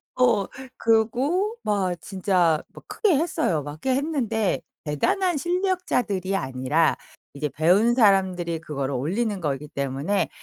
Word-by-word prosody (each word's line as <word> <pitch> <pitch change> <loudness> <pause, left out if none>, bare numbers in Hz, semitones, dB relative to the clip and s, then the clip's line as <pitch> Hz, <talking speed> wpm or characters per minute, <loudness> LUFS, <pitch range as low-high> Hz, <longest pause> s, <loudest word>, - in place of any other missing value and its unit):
어. 235 -6 +3 0.3
그리고 260 - +1
막 195 -4 0
진짜 185 -5 +1
막 - - -14
크게 375 -10 +2
했어요. 300 - 0
막 145 0 -6
크게 260 -1 +1
했는데 260 - 0 0.2
대단한 340 - +1
실력자들이 290 - 0
아니라 130 +4 +1 0.4
이제 145 +1 -3
배운 185 - +3
사람들이 190 -7 +2
그거를 140 -3 -4
올리는 195 - -1
거기 145 -1 -2
때문에 140 +8 -1
195 Hz, 280 characters per minute, -24 LUFS, 155-255 Hz, 0.4 s, 어